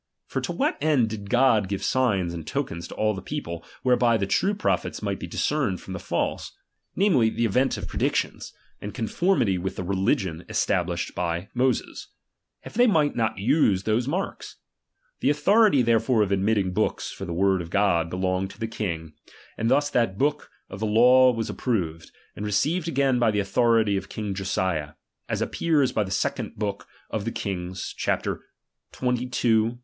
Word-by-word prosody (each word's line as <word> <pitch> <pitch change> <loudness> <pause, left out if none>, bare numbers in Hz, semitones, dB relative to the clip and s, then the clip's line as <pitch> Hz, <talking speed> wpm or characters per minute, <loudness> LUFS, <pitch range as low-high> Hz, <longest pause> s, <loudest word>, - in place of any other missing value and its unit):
For - - -3
to - - -3
what - - 0
end 140 -7 +3
did 100 -2 -6
God 120 -5 +4
give 100 -1 -3
signs 100 -10 +1
and 80 -3 -7
tokens 85 +1 -3
to - - -10
all 110 0 +1
the 95 - -6
people, 85 - -5 0.2
whereby 120 -2 +3
the 100 - -1
true 195 - +1
prophets 210 - -1
might - - -2
be - - -6
discerned - - -1
from - - -8
the - - -5
false; - - -2 0.4
namely, 150 - +3
the 115 +1 -1
event 125 +5 +1
of - - -6
predictions, - - -1 0.3
and 105 - -6
conformity 120 - +1
with 95 +2 -4
the - - -4
religion 95 -2 0
esta 90 - +1
blished 85 0 -4
by 85 +1 -2
Moses; 125 0 -1 0.6
if - - -9
they 245 +2 +4
might 155 -9 +2
not 115 -4 0
use 105 - +2
those 110 +3 0
marks? 180 +7 -3 0.6
The - - +2
authority 150 - +4
therefore 115 0 +3
of 100 - -3
admitting 100 -1 +1
books 110 +3 -1
for 95 - -7
the 85 - -5
word 95 +2 +2
of 85 - -8
God, 85 -4 +2
belonged 95 +1 -1
to - - -14
the 115 - -2
king; 85 -8 -4 0.4
and 115 - -1
thus 145 +2 +2
that 115 -7 +1
book 150 +3 0 0.2
of 95 - -9
the 110 - -1
law 125 +4 +6
was 115 -2 -3
approved, 85 -10 -2 0.3
and 105 - -6
received 155 - 0
again 135 -5 +2
by 120 -2 +3
the 105 -1 +1
authority 110 0 +2
of - - -6
king 105 -2 -4
Josiah; 95 -5 -2 0.4
as - - 0
appears 150 -6 +1
by 110 - +1
the 95 - -7
second 95 - -2
book 100 -1 -4 0.2
of 110 - -2
the 115 - -2
Kings, 95 -3 -4
chap. - - -1
xxii. 125 -1 -5
xxiii. 115 -1 +2
110 Hz, 180 wpm, -25 LUFS, 95-125 Hz, 0.6 s, law